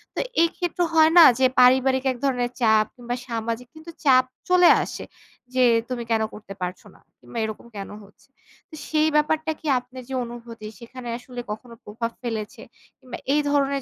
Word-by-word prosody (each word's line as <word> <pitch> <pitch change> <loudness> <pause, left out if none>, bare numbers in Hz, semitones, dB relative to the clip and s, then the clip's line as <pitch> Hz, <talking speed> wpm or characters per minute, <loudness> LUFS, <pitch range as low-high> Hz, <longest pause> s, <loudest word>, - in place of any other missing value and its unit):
তো - - -2 0.2
এই 335 - +4
ক্ষেত্রে 355 0 -1
হয় 320 0 +6
না 340 - +11 0.2
যে 260 - +4
পারিবারিক 260 +1 +4
এক 255 - -6
ধরনের 250 -3 0
চাপ 220 -2 +4
কিংবা 245 0 -5
সামাজিক 230 +1 -4
কিন্তু 315 +2 -11
চাপ 255 -2 +6 0.3
চলে 360 -1 +6
আসে - - -7 0.5
যে, 255 0 +3 0.3
তুমি 245 -2 -3
কেন 225 -1 +2
করতে 205 -2 -10
পারছো 180 0 -5
না - - -21 0.2
কিংবা - - -11
এরকম 220 +2 -7
কেন 195 - -6
হচ্ছে? 200 +1 -21 0.4
তো - - -25 0.2
সেই 310 0 +2
ব্যাপারটা 310 +1 +1
কি 315 - -8
আপনার 255 +1 -12
যে - - -6
অনুভূতি 235 -2 -9
সেখানে 245 +1 -9
আসলে 245 0 -8
কখনো 230 +2 -8
প্রভাব 230 +2 -4
ফেলেছে? 220 -3 -5 0.4
কিংবা 255 - -9 0.2
এই 300 - +3
ধরনের 280 -1 +1
250 Hz, 180 wpm, -23 LUFS, 230-280 Hz, 0.5 s, না